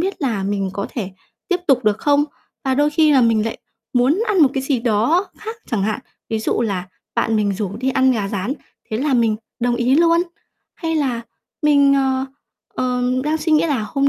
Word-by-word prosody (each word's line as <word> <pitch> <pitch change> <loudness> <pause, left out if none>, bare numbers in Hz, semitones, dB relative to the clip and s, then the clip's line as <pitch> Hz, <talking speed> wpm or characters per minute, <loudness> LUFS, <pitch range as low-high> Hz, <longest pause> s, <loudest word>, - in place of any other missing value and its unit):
biết 380 -1 -2
là 225 -8 0
mình 195 -1 -1
có 200 +1 -3
thể 200 -6 -4 0.4
tiếp 360 -2 +1
tục 255 -3 +3
được 210 0 +2
không? 290 +2 +3 0.4
Và 265 -1 +1
đôi 290 +2 +2
khi 305 0 +4
là 270 - +5
mình 225 -2 +3
lại 225 - -4 0.3
muốn 265 - +3
ăn 415 - +2
một 280 - +6
cái 270 - -1
gì 270 -2 0
đó 240 - +2
khác 445 +1 -6
chẳng 220 -5 0
hạn. 215 +5 -1 0.3
Ví 220 - -1
dụ 220 - -1
là 195 -5 -2 0.3
bạn 225 - +1
mình 205 -1 +1
rủ 200 0 -4
đi 260 +3 -1
ăn 260 0 +3
gà 210 -5 -1
rán, 205 +5 -2 0.4
thế 215 - -1
là 275 +3 +1
mình 230 -3 +2 0.2
đồng 240 0 +1
ý 245 +2 +2
luôn, 335 +2 +4 0.5
hay 325 -1 -3
là 260 -6 0 0.4
mình, 285 -2 +5
ờ, 265 -1 +1 0.5
ờ, 250 -1 -1 0.2
đang 305 +1 +1
suy 315 +1 -1
nghĩ 305 +1 +4
là 270 -9 0
"Hôm 275 +5 +1
255 Hz, 215 wpm, -20 LUFS, 220-295 Hz, 0.5 s, một